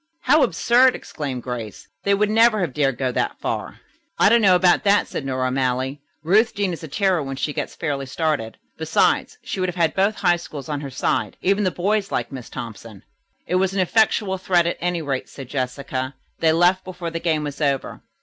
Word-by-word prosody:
"How 300 +4 +4
absurd!" 245 +8 +4
exclaimed 135 -5 -5
Grace. 120 -4 -6 0.2
"They 200 0 +4
would 210 +1 +1
never 225 -1 +4
have 165 -8 -2
dared 135 -4 +1
to 135 - -4
go 130 - +1
that - - -1
far." - - -4 0.4
"I - - +5
don't 235 +1 +5
know 190 -3 +6
about 180 0 +4
that," 205 0 +3
said - - -5
Nora 130 -1 -1
O'Malley. 130 +1 -1 0.2
"Ruth 215 +8 +3
Deane 200 -3 0
is 165 - -7
a - - -5
terror 185 +2 +1
when 135 -1 -4
she 145 +2 -2
gets - - -4
fairly 140 -4 -3
started. 145 -6 -2 0.2
Besides, 160 - +1
she - - -5
would 185 0 0
have 175 - -6
had 165 -3 +1
both 200 +3 +2
High 175 -2 +2
Schools 150 -5 -9
on 145 -1 -2
her 140 - -6
side. 115 -4 -1
Even 200 +2 +2
the - - +3
boys 195 +3 -1
like - - -2
Miss 130 -3 -8
Thompson." 115 -4 -9 0.4
"It 180 - 0
was 190 +1 0
an - - 0
effectual 195 0 +2
threat 180 -2 +2
at 170 - -1
any 175 -1 -1
rate," 135 -3 -3
said 135 -3 -9
Jessica. 130 0 -3 0.2
"They 160 -1 +4
left 175 +3 +3
before 180 -2 -6
the 165 - -3
game 160 -3 0
was 145 0 -6
over. 140 -2 -1
165 Hz, 215 wpm, -22 LUFS, 135-190 Hz, 0.4 s, know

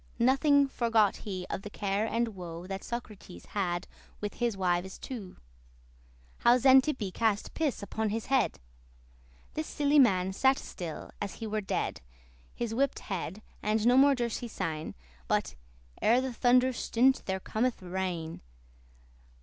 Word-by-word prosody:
Nothing 275 +3 +4
forgot 225 -6 +2
he 185 -3 -5
of - - -3
the 205 - -7
care 200 +2 -1
and 235 +1 0
woe 175 -4 -8
That 195 +1 -5
Socrates 210 - -7
had 175 -3 -2 0.3
with 205 -1 -4
his 235 -4 -1
wives 185 0 0
two; 220 -9 -8 1.0
How 240 +1 +5
Xantippe 260 -4 +4
cast 220 -3 0
piss 295 -10 -1
upon 220 +1 -2
his 220 +2 -3
head. 265 -1 +1 0.9
This 310 0 -3
silly 290 0 +3
man 190 -7 +4
sat 265 +6 +3
still, 170 -4 -7
as 200 -2 -3
he 225 - -6
were 215 0 -1
dead, 195 - -2 0.5
He 240 - -2
wip'd 275 +4 +1
his - - -11
head, 190 +2 -4 0.2
and 215 +1 +1
no 245 +1 +6
more 275 +1 +6
durst 240 -3 -2
he 240 - -5
sayn, 160 -8 -4 0.3
But, - - 0 0.5
"Ere 235 +3 +5
the 260 -1 -2
thunder 250 +2 +4
stint* 255 +3 +2
there 190 0 -1
cometh 225 +2 -1
rain." 175 -3 -3
220 Hz, 150 wpm, -30 LUFS, 190-250 Hz, 1.0 s, no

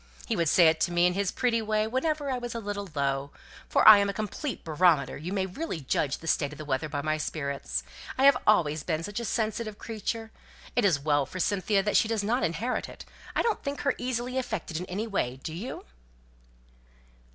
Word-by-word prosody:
He - - -1
would 165 -3 +1
say 170 0 +6
it 160 0 +3
to 175 - +1
me, 175 0 +3
in 180 - +3
his 200 0 0
pretty 235 -2 +1
way, 215 0 +1
whenever 280 +4 -1
I 255 - -1
was 240 -1 -5
a - - -2
little 200 -2 -5
low 140 0 0 0.4
for - - +4
I 215 -1 +11
am 200 0 +1
a - - -2
complete 215 +7 -4
barometer 155 -4 +3
you 165 +5 -6
may 195 -1 0
really 190 - -4
judge 140 0 0
of - - -15
the 165 - -9
state 145 -2 +1
of 150 - -10
the 155 - -7
weather 145 +2 -1
by 145 -1 -3
my 155 +1 0
spirits, 140 - -3 0.3
I 265 - +1
have 280 -1 +8
always 160 -8 +3
been 160 +1 -2
such 205 +5 -4
a 235 - -4
sensitive 215 0 -2
creature! 225 0 -4 0.4
It 245 - +3
is 175 -7 +3
well 145 -1 +1
for 185 - -7
Cynthia 200 +1 +1
that 210 - +2
she 225 - +3
does 220 -2 -1
not 235 +5 +1
inherit 215 +10 -1
it; - - -11 0.3
I - - +2
don't 455 - 0
think 280 0 -4
her 280 - +2
easily 250 +1 -2
affected 215 -10 -4
in 180 +2 -5
any 200 +5 -3
way, 160 - -1
do 160 - -5
you?" 205 +10 -6
200 Hz, 225 wpm, -28 LUFS, 155-230 Hz, 0.4 s, I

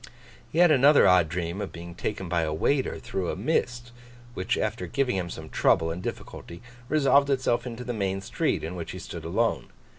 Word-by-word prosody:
He - - -5
had 175 -1 +6
another 140 -4 +6
odd 90 -3 +5
dream 85 +3 -3
of - - -5
being 85 0 -9
taken 95 +2 -4
by 85 -1 0
a 80 -1 -1
waiter 130 - 0
through 95 -2 -4
a - - -2
mist, 120 - -1 0.4
which, 95 -4 -1
after 110 +2 -2
giving 135 -5 0
him 90 -2 -2
some 80 -2 -8
trouble 80 +1 +2
and 85 +2 -5
difficulty, 85 -1 -7 0.3
resolved 140 -2 +4
itself 125 -2 +1
into 120 0 -6
the 120 0 -4
main 95 -3 -1
street, 95 - -1
in 80 +3 -5
which 85 -2 -6
he - - -7
stood - - -8
alone. - - 0
100 Hz, 200 wpm, -26 LUFS, 85-130 Hz, 0.4 s, had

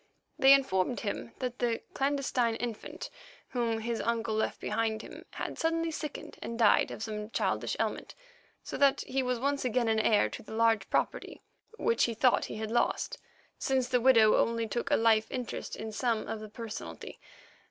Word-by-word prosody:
They 270 0 +7
informed 245 -5 +2
him 230 +2 -4
that 250 -1 -4
the 235 -2 0
clandestine 270 -4 +1
infant 230 -2 -5 0.4
whom 230 -3 -1
his 230 0 -2
uncle 230 -1 -1
left 220 - -1
behind 220 0 -1
him - - -11
had - - -6
suddenly 330 0 0
sickened 300 -2 -6
and 230 - -5
died 225 -3 +4
of - - -6
some 210 -1 -5
childish - - -1
ailment, - - -2 0.5
so - - -5
that 280 -1 +4
he 270 +1 -1
was 250 -1 0
once 280 +2 0
again 250 -1 +1
heir 215 -1 +4
to - - -8
the 220 - -9
large 225 -2 +2
property - - -2 0.3
which 465 +1 +2
he 235 - -3
thought 250 +2 +3
he - - -7
had 220 0 -4
lost, - - 0 0.4
since 260 -2 0
the 250 -3 +2
widow 230 -4 +6
only 230 -1 +1
took 235 +3 -3
a - - +4
life 220 -1 +3
interest 250 -2 -4
in 220 0 -6
some 230 0 -1
of 225 - -4
the 215 0 -8
personalty. 225 0 -7
230 Hz, 175 wpm, -30 LUFS, 220-255 Hz, 0.5 s, They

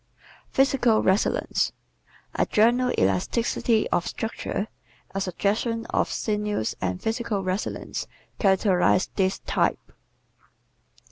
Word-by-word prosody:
Physical 265 -4 +3
Resilience 190 +2 +1 0.6
¶ - - 0
A - - +2
general 245 +4 +3
elasticity 215 - +1
of 175 - +1
structure, 220 -2 -3 0.5
a 195 - -2
suggestion 215 +5 -1
of - - +1
sinews 210 - -1
and 90 -1 -1
physical 225 -3 -2
resilience 185 +2 -3 0.3
characterizes 190 -2 +3
this 190 -1 +1
type. - - 0
210 Hz, 95 wpm, -25 LUFS, 190-230 Hz, 0.6 s, Physical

